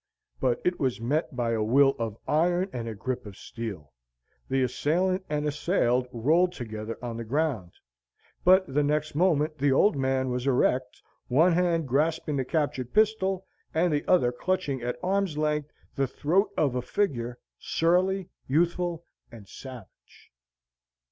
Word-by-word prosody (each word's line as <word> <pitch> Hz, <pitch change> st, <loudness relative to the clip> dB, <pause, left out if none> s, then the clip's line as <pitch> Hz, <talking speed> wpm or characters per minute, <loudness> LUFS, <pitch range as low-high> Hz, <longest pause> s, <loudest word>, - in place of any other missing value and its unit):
But 125 Hz, -2 st, +1 dB
it 180 Hz, 0 st, +1 dB
was 130 Hz, -4 st, 0 dB
met 145 Hz, +5 st, -1 dB
by 120 Hz, -2 st, 0 dB
a 115 Hz, -1 st, 0 dB
will 135 Hz, +5 st, +4 dB
of 115 Hz, -2 st, -3 dB
iron 175 Hz, +4 st, +1 dB
and 115 Hz, -2 st, -4 dB
a 110 Hz, -, -6 dB
grip 125 Hz, +2 st, -4 dB
of 100 Hz, -, -11 dB
steel. 100 Hz, -, -7 dB, 0.6 s
The 135 Hz, 0 st, +2 dB
assailant 180 Hz, +9 st, 0 dB
and 150 Hz, 0 st, -1 dB
assailed 140 Hz, -5 st, +1 dB
rolled 160 Hz, +10 st, +2 dB
together 110 Hz, -4 st, -6 dB
on 120 Hz, -2 st, -4 dB
the 115 Hz, -, -4 dB
ground. 125 Hz, -, -1 dB, 0.7 s
But 185 Hz, +1 st, +6 dB
the 150 Hz, -, +3 dB
next 150 Hz, +1 st, 0 dB
moment 155 Hz, -2 st, +1 dB
the 140 Hz, 0 st, +3 dB
old 155 Hz, +7 st, +4 dB
man 130 Hz, -1 st, 0 dB
was 125 Hz, +2 st, -2 dB
erect; 125 Hz, -1 st, +1 dB, 0.2 s
one 160 Hz, +8 st, +4 dB
hand 170 Hz, -3 st, +1 dB
grasping 150 Hz, +3 st, 0 dB
the 135 Hz, -, 0 dB
captured 135 Hz, -4 st, -2 dB
pistol, 195 Hz, -3 st, +2 dB, 0.3 s
the 160 Hz, -3 st, +2 dB
other 150 Hz, -10 st, +4 dB
clutching 145 Hz, 0 st, -2 dB
at 120 Hz, +1 st, -3 dB
arm's 190 Hz, -4 st, 0 dB
length 150 Hz, -1 st, 0 dB, 0.2 s
the 135 Hz, -1 st, 0 dB
throat 170 Hz, -, +1 dB
of 140 Hz, -5 st, +2 dB
a 125 Hz, -, -1 dB
figure, 125 Hz, -, -2 dB, 0.2 s
surly, 185 Hz, +3 st, +1 dB, 0.2 s
youthful, 170 Hz, +3 st, 0 dB, 0.3 s
and 110 Hz, -4 st, -12 dB
savage. 125 Hz, -5 st, -13 dB
145 Hz, 150 wpm, -27 LUFS, 125-175 Hz, 0.7 s, But